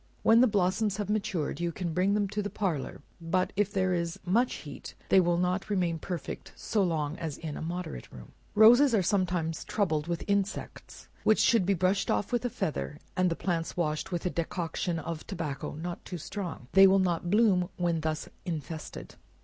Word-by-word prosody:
When 225 +1 +6
the 255 - +6
blossoms 200 0 +1
have 205 -1 -2
matured, 200 -8 -1
you 170 0 -1
can 170 -1 -4
bring 185 +4 +2
them 205 -1 +1
to 210 +1 -2
the 205 - -3
parlor; 180 -9 -3 0.2
but 185 +3 0
if 205 0 +1
there 185 -2 +1
is 170 -1 -2
much 230 +8 +2
heat, 145 -3 -9
they 190 - +7
will 175 -1 +2
not 180 +3 0
remain 175 -5 0
perfect 170 -3 -6
so 215 - -1
long 160 -4 -1
as 160 -4 -4
in 155 -3 -6
a - - -6
moderate 170 - -5
room. 60 - -12 0.2
Roses 235 +4 +7
are 195 - +3
sometimes 180 -4 0
troubled 160 -7 0
with 170 -1 -2
insects, 200 0 -3 0.2
which 215 - +4
should 220 -6 +4
be 200 - +3
brushed 185 +3 +1
off 205 - 0
with 240 0 0
a 245 - 0
feather, 150 -6 -3 0.2
and 185 -1 +3
the 165 - -1
plants 170 -2 -2
washed 155 -1 -1
with 175 -1 -3
a 180 - +1
decoction 170 +1 -2
of 160 0 -5
tobacco, 155 -9 -4
(not 170 +3 -5
too 180 - -6
strong,) 175 - -6
they 195 0 +8
will 190 +1 +5
not 175 -2 0
bloom 195 -4 +3
when 170 -2 0
thus 155 0 -2 0.2
infested. 160 -2 -6
180 Hz, 195 wpm, -29 LUFS, 165-200 Hz, 0.2 s, they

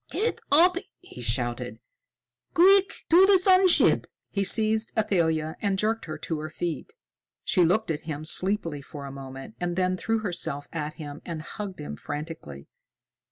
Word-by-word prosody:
"Get 460 +3 -1
up!" 350 +5 +5 0.2
he 360 - -12
shouted. 120 +1 -2 0.8
"Quick! 385 +2 +6 0.2
To 365 +3 +7
the 395 -1 +6
sun 370 0 +5
ship!" 350 - +4 0.2
He 200 - 0
seized 220 +2 +3
Athalia 160 -7 0
and 200 -2 0
jerked 220 +3 -1
her 155 -1 -6
to 155 +1 -4
her 155 +1 -5
feet. 170 - -5 0.5
She 180 - +3
looked 180 +3 +1
at 155 -1 -3
him 150 0 -5
sleepily 170 -4 0
for 140 0 -9
a 140 - -7
moment, 135 -3 -9
and 175 -1 -2
then 185 0 0
threw 225 +4 -1
herself 170 -8 -3
at 155 -2 -4
him 145 -3 -8
and 165 -3 -6
hugged 200 +1 -7
him 75 0 -6
frantically. 145 - -7
175 Hz, 160 wpm, -26 LUFS, 150-220 Hz, 0.8 s, To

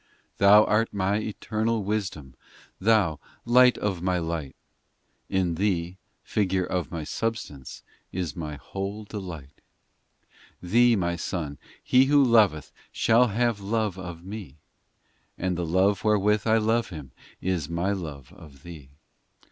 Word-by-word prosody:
VI - - -36
Thou 105 +2 +8
art 110 +2 +1
My 100 +1 0
Eternal 110 +1 -2
Wisdom, 95 -10 -3 0.5
Thou, 95 -7 +2 0.3
Light 125 +1 +5
of 95 -4 -2
My 90 0 0
light; 80 -5 -4 0.7
In 95 -3 0
Thee, 90 -1 -1 0.2
Figure 95 -3 0
of 90 -1 -2
My 85 -3 -5
substance, 95 - -5 0.3
Is 90 -5 -4
my 75 -3 -5
whole 100 +8 -6
delight. 90 -9 -8 1.0
VII 90 - -10
Thee, 120 +1 +5
My 85 -3 -1
Son, 75 -5 -4 0.2
he 130 +1 +5
who 145 +1 +5
loveth 105 - +3 0.2
Shall 115 +2 +3
have 115 0 0
love 105 -2 -1
of 90 -2 -8
Me 95 -8 -8 0.8
And 90 0 -1
the 85 -1 -3
love 95 +4 +2
wherewith 105 0 +2
I 110 0 +4
love 115 +1 +1
him 75 -7 -9 0.3
Is 85 -5 -2
My 85 +4 -1
love 75 -9 -6
of 70 -4 -15
Thee. 80 -6 -11
95 Hz, 140 wpm, -26 LUFS, 85-110 Hz, 1.0 s, Thou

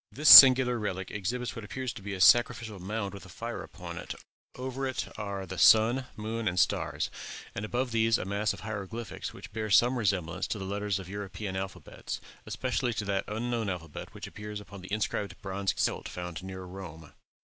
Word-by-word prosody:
This 150 +2 +2
singular 130 -2 +11
relic 95 -3 -4
exhibits 120 +5 -3
what 115 - -7
appears 130 +3 -4
to - - -10
be 100 0 -5
a - - -7
sacrificial 115 0 +4
mound 100 +1 -4
with 100 - -9
a 95 - -13
fire - - -6
upon - - -8
it; - - -7 0.4
over 130 +1 -4
it 130 - -3
are 100 -2 -5
the 95 -1 -7
sun, 120 +4 +5
moon, 110 +1 -4
and 90 -1 0
stars, - - 0 0.4
and 100 - -5
above 120 +3 -2
these 115 0 +3
a - - -5
mass 100 +2 0
of - - -8
hieroglyphics 110 +2 -6
which - - -12
bear 110 -1 -3
some 120 +6 +4
resemblance 90 -6 -1
to - - -3
the 95 - -6
letters 100 0 -2
of 95 -2 -8
European 100 0 -6
alphabets, 95 0 -6
and - - -20 0.2
especially 125 -2 -2
to 105 - -3
that 100 -1 -1
unknown 115 0 -2
alphabet 85 -4 -6
which - - -8
appears 105 0 -7
upon 100 -1 -11
the 90 - -11
inscribed 100 -2 -2
bronze 95 0 -1
celt - - -1
found 90 -2 -6
near 95 0 -7
Rome. 85 -4 -10
105 Hz, 195 wpm, -29 LUFS, 95-115 Hz, 0.4 s, singular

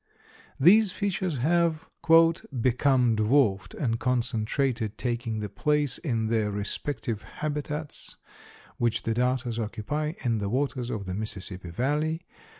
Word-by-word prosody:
These 200 +7 +6
fishes 185 -5 -2
have 165 +3 +1 0.7
"become 125 0 +3
dwarfed 110 -3 +2
and 115 -6 -1
concentrated, 120 -2 0
taking 120 -3 -2
the 105 - -2
place 150 - 0
in 115 -8 -1
their 110 -1 +1
respective 105 +2 -3
habitats 150 0 -5 0.6
which 120 -1 0
the 115 - 0
darters 125 -1 0
occupy 120 +8 -2
in 115 -4 +1
the 100 -1 -2
waters 130 0 -1
of 105 -4 -4
the 95 - -4
Mississippi 95 -3 -6
valley. 150 - -1
125 Hz, 120 wpm, -27 LUFS, 110-150 Hz, 0.7 s, These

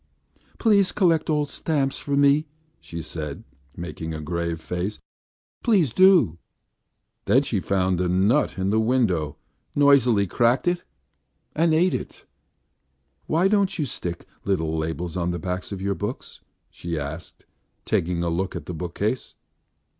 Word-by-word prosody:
"Please 200 -4 +3
collect 165 -6 +2
old 150 -2 0
stamps 140 -4 -1
for 140 -1 -2
me!" 140 +2 +4 0.3
she 85 -1 -7
said, 75 -3 -6 0.3
making 80 -1 -5
a - - -5
grave 85 +1 -3
face. 90 +5 -3 0.7
"Please 185 - +3
do." 175 - +5 0.9
Then - - +4
she - - -1
found 95 -2 0
a 90 - +1
nut 100 +11 +2
in 95 +1 0
the 110 - +3
window, 110 - +1 0.4
noisily 130 -8 +5
cracked 120 - +2
it 175 0 +1 0.7
and 165 +1 +3
ate 175 +4 +3
it. - - -6 1.0
"Why 170 +4 +3
don't 200 -2 +2
you 155 - 0
stick 85 -8 -5 0.2
little 80 -5 0
labels 80 +2 -3
on 90 -1 -1
the 85 - -2
backs 90 +3 -4
of 95 -1 -5
your 100 0 +1
books?" 105 +6 -6 0.3
she 85 -1 -5
asked, 75 +2 -7 0.4
taking 85 0 0
a 85 - 0
look 95 +3 -2
at 85 -4 -6
the 90 - -5
bookcase. 90 +8 -3
100 Hz, 145 wpm, -24 LUFS, 85-145 Hz, 1.0 s, do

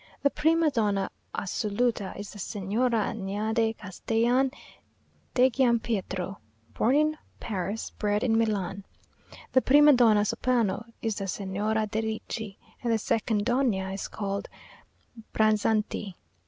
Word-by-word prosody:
The 280 - +4
prima 320 +1 +3
donna 205 -5 0 0.2
assoluta 210 +1 -1
is 205 0 -7
the 205 - -11
Signora 215 +3 0
Anaide 220 +2 -1
Castellan 235 +7 +1 0.9
de 255 0 +6
Giampietro, 225 -7 0 0.4
born 245 +5 +2
in 305 +1 +2 0.2
Paris, 200 0 -3
bred 210 0 -1
in 230 -3 +2
Milan. 200 -4 0 0.7
The 260 - +4
prima 295 +3 +7
donna 220 -5 +5
soprano 230 -1 0 0.2
is 225 -2 -1
the 195 - -3
Signora 205 +3 -1
de 215 +1 -2
Ricci; 220 -1 -5 0.2
and 240 - 0
the 225 - +3
second 215 -1 0
donna 235 -7 +1
is 195 - -4
called 200 -1 -4 0.9
Branzanti. 215 -2 +1
220 Hz, 120 wpm, -27 LUFS, 200-240 Hz, 0.9 s, prima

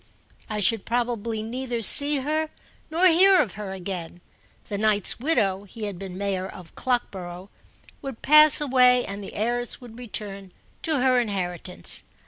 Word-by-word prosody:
I 210 -1 -3
should 225 +1 +3
probably 230 -2 -2
neither 240 0 -4
see 285 +4 +5
her 310 +3 -1 0.4
nor 335 +4 +1
hear 370 +2 +6
of 205 - 0
her 205 -1 -7
again: 180 -2 -6 0.5
the 205 - -4
knight's 210 -1 +2
widow 205 -9 0
(he 215 +3 -10
had 200 -4 -5
been 190 -2 -8
mayor 195 -1 -2
of 180 -4 -12
Clockborough) 190 -7 -4 0.5
would 270 -4 -8
pass 305 +1 +8
away 250 -3 +4
and 200 +1 -7
the - - -9
heiress 240 +3 -1
would 240 -2 -13
return 200 -5 -6 0.3
to 310 -5 0
her 255 -1 +3
inheritance. 180 - -4
225 Hz, 150 wpm, -24 LUFS, 195-255 Hz, 0.5 s, pass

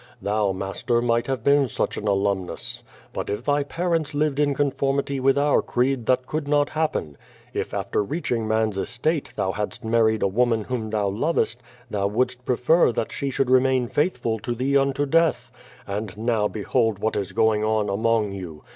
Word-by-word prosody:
Thou, 105 -1 0
master, 95 +5 -1
might 120 0 +1
have 130 -4 -2
been 140 0 +4
such - - -2
an 105 - -4
alumnus. 100 -2 -1 0.3
lUit - - -3
if 105 +3 -3
thy 145 +1 +2
parents 165 0 -1
lived 145 -1 0
in 145 -1 +2
conformity 140 -1 0
with 135 +1 +3
our 145 0 +3
creed 125 -1 0
that 130 0 +2
could 150 +1 -3
not 145 0 +2
happen. 155 - -2 0.3
K - - 0
after - - -1
reaching 120 - -2
man's 110 -2 +1
estate 140 - -1
thou 95 - 0
hadst 105 +1 -4
married 110 -1 +2
a - - +4
woman 115 +2 +1
whom 115 -2 -3
thou 105 -2 0
lovost, 120 +2 0 0.3
thou 100 -1 0
wouldst 125 +4 -1
prefer 125 +5 +3
that 115 - -3
she 140 - -3
should 130 -1 0
remain 130 -1 +3
faithful 120 -7 0
to 120 +3 -3
thee 135 +4 0
unto 140 +1 +2
death. 165 +3 +1 0.3
And 105 0 -5
now 110 -1 +1
])ehold 110 +1 0
what 110 +3 -1
is 100 -3 -2
going 110 -1 +2
on 110 -1 +1
among 110 +1 +1
you! 90 -6 -8
120 Hz, 180 wpm, -24 LUFS, 105-140 Hz, 0.3 s, been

